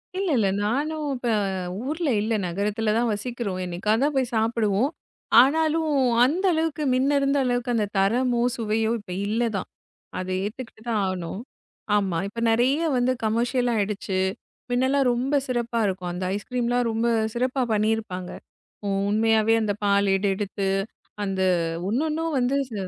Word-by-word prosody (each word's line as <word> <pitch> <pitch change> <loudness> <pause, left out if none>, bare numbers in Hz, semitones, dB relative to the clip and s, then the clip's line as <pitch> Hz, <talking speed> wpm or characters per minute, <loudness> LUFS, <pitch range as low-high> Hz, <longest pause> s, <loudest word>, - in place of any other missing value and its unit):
இல்ல 385 0 -1
இல்ல. 210 -4 +3 0.2
நானும் 295 +7 -1 0.2
ப - - -3 0.6
ஊர்ல 310 +2 -1
இல்ல. 220 +2 -1
நகரத்துல 210 +4 -1
தான் 235 0 +1
வசிக்குறோம். 210 -3 -4
என்னைக்காத்தான் 215 +11 0
போய் 260 -2 0
சாப்பிடுவோம். 225 +2 +1 0.5
ஆனாலும் 315 +4 +3 0.3
அந்தளவுக்கு 320 +1 +1
மின்னருந்த 275 +2 +2
அளவுக்கு 245 0 0
அந்தத் 210 -3 -1
தரமோ, 240 +5 +2 0.2
சுவையோ 220 0 0
இப்ப 205 -3 -11 0.2
இல்ல 220 +3 0
தான். 190 - -3 0.5
அத 185 - -4 0.2
ஏத்துக்குட்டு 220 +1 -7
தான் 220 -3 +1
ஆகணும். 185 -1 -4 0.6
ஆமா. 190 -5 0
இப்ப 230 +3 -6
நெறைய 265 +8 +2
வந்து 250 +1 +2
கமர்சியல்லாயிடுச்சு 220 -4 0 0.5
மின்னலா 260 +3 +2
ரொம்ப 255 +4 -1
சிறப்பா 240 -2 -1
இருக்கும். 185 -2 -3
அந்த 180 +1 -4
ஐஸ் 205 - -6
கிரீம்லாம் 245 -1 +1
ரொம்ப 225 +1 0 0.3
சிறப்பா 255 +2 0
பண்ணிருப்பாங்க. 215 -4 -1 0.6
உ - - 0 0.2
உண்மையாவே 220 +1 +3
அந்தப் 210 -1 -2
பால் 200 0 +3
ஏடு 195 +1 0
எடுத்து, 200 -1 -2 0.6
அந்த 195 -1 -2 0.5
ஒன்னொன்னும் 310 +7 -1
வந்து 250 +2 +1 0.2
ச - - -7
230 Hz, 135 wpm, -24 LUFS, 205-260 Hz, 0.6 s, இல்ல